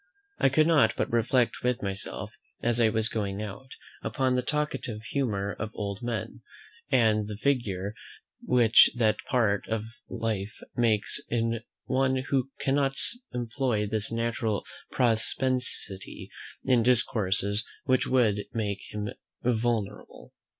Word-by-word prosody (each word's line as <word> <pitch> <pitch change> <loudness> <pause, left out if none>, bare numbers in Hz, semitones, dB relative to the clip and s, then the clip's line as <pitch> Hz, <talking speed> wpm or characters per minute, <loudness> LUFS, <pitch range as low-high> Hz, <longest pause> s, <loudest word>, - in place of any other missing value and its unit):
I - - +5
could 155 +4 +4
not 150 -9 +4
but - - -1
reflect 120 +1 +2
with 125 -2 0
myself, 100 0 -3 0.3
as 120 0 +1
I 110 - +5
was 110 0 +1
going 100 -4 -2
out, 105 +6 -8 0.3
upon 130 -2 0
the 125 - +2
talkative 125 -6 -2
humour 110 -6 -1
of 110 - -2
old 100 -1 -4
men, 120 -4 -4 0.5
and 110 -4 +3
the 105 - -4
little 105 - -11
figure 105 -8 0 0.5
which 120 -3 +6
that 110 -3 +3
part 110 -6 +2
of 110 -1 -1 0.3
life 110 -2 -3 0.2
makes 110 -3 +1
in 115 -1 0 0.2
one 130 0 +2 0.2
who 135 -1 +2
cannot 140 -1 +1 0.3
employ 120 -2 -1
this 105 +1 -1
natural 115 -2 -1 0.3
propensity 125 -3 -1 0.3
in 125 -2 +4
discourses 105 -4 +2 0.2
which 130 -1 +2
would 110 -6 +2
make 105 -3 -1
him 105 0 -3 0.3
venerable. 115 -4 -2
115 Hz, 130 wpm, -28 LUFS, 105-125 Hz, 0.5 s, which